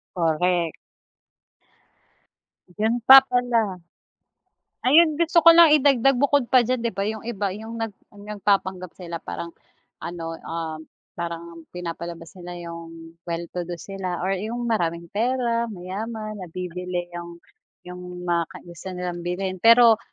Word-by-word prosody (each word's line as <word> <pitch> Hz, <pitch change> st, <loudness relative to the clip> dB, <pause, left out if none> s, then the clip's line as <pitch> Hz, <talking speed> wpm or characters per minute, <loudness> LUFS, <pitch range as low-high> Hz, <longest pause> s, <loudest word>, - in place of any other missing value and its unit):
Correct. 170 Hz, 0 st, +1 dB, 2.0 s
Yun 225 Hz, +3 st, +1 dB
pa 270 Hz, 0 st, +12 dB
pala. 235 Hz, -7 st, 0 dB, 1.1 s
Ayun, 310 Hz, +2 st, +5 dB
gusto 335 Hz, 0 st, +3 dB
ko 335 Hz, -, +10 dB
lang 330 Hz, -2 st, +8 dB
idagdag 275 Hz, -2 st, +4 dB
bukod 285 Hz, -1 st, +2 dB
pa 255 Hz, -2 st, +6 dB
diyan 255 Hz, +2 st, 0 dB
'di 235 Hz, -, -1 dB
ba, 195 Hz, -, -1 dB
yung 215 Hz, 0 st, -4 dB
iba 205 Hz, -4 st, -2 dB
yung 220 Hz, +4 st, -7 dB
nag 225 Hz, -1 st, -3 dB, 0.2 s
nagpapanggap 200 Hz, -3 st, -1 dB
sila 170 Hz, -2 st, -6 dB
parang 170 Hz, +1 st, -6 dB, 0.5 s
ano, 165 Hz, -1 st, -6 dB
ah, 165 Hz, -1 st, -4 dB, 0.4 s
parang 170 Hz, -1 st, -6 dB
pinapalabas 170 Hz, -1 st, -6 dB
nila 175 Hz, 0 st, -8 dB
yung 165 Hz, 0 st, -10 dB
well 170 Hz, 0 st, -2 dB
to 175 Hz, -1 st, -4 dB
do 175 Hz, -, -4 dB
sila 185 Hz, 0 st, -5 dB
or 190 Hz, -, 0 dB
yung 230 Hz, +4 st, -4 dB
maraming 170 Hz, -7 st, -1 dB
pera, 235 Hz, +1 st, 0 dB
mayaman, 215 Hz, +3 st, -6 dB
nabibili 180 Hz, 0 st, -5 dB
yung 170 Hz, 0 st, -8 dB, 0.4 s
yung 180 Hz, 0 st, -9 dB
mga 170 Hz, -1 st, +1 dB
kai -, -, -11 dB
gusto 170 Hz, +2 st, -10 dB
nilang 180 Hz, -1 st, -4 dB
bilhin. 185 Hz, +1 st, -3 dB
Pero 230 Hz, 0 st, +7 dB
185 Hz, 135 wpm, -24 LUFS, 170-230 Hz, 2.0 s, pa